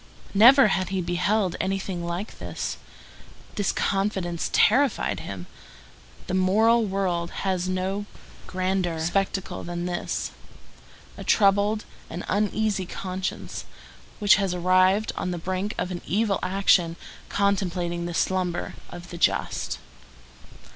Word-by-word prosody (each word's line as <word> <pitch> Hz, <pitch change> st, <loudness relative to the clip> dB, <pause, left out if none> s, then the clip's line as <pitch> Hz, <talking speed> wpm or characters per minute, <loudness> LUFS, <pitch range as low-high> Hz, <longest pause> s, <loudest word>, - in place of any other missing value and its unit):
Never 235 Hz, +4 st, +8 dB
had 185 Hz, -1 st, 0 dB
he 190 Hz, 0 st, -1 dB
beheld 180 Hz, +2 st, +1 dB
anything 190 Hz, -2 st, -2 dB
like 170 Hz, +5 st, -5 dB
this. -, -, -4 dB, 0.8 s
This 205 Hz, -3 st, 0 dB
confidence 190 Hz, -4 st, -1 dB
terrified 230 Hz, -, +3 dB
him. 90 Hz, +2 st, -7 dB, 0.8 s
The -, -, -4 dB
moral 220 Hz, +5 st, +4 dB
world 180 Hz, -3 st, -1 dB, 0.2 s
has 185 Hz, -1 st, 0 dB
no 190 Hz, +2 st, -2 dB, 0.4 s
grander 185 Hz, -2 st, -1 dB
spectacle 190 Hz, +2 st, -1 dB
than 175 Hz, 0 st, -4 dB
this: 175 Hz, -1 st, -2 dB, 0.9 s
a -, -, -5 dB
troubled 205 Hz, +1 st, +3 dB, 0.2 s
and 175 Hz, +2 st, -6 dB
uneasy 210 Hz, -1 st, 0 dB
conscience, 185 Hz, 0 st, -4 dB, 0.5 s
which 205 Hz, -2 st, +5 dB
has 195 Hz, -3 st, 0 dB
arrived 185 Hz, +4 st, +3 dB
on 185 Hz, -, -2 dB
the 175 Hz, -, -2 dB
brink 185 Hz, +4 st, -3 dB
of 180 Hz, -, -2 dB
an 175 Hz, -, -4 dB
evil 205 Hz, 0 st, +1 dB
action, 185 Hz, -3 st, +3 dB, 0.3 s
contemplating 180 Hz, -4 st, 0 dB
the 175 Hz, -, -5 dB
slumber 180 Hz, -1 st, 0 dB, 0.2 s
of 175 Hz, 0 st, -10 dB
the 170 Hz, -, -7 dB
just. -, -, 0 dB
185 Hz, 120 wpm, -25 LUFS, 175-200 Hz, 0.9 s, Never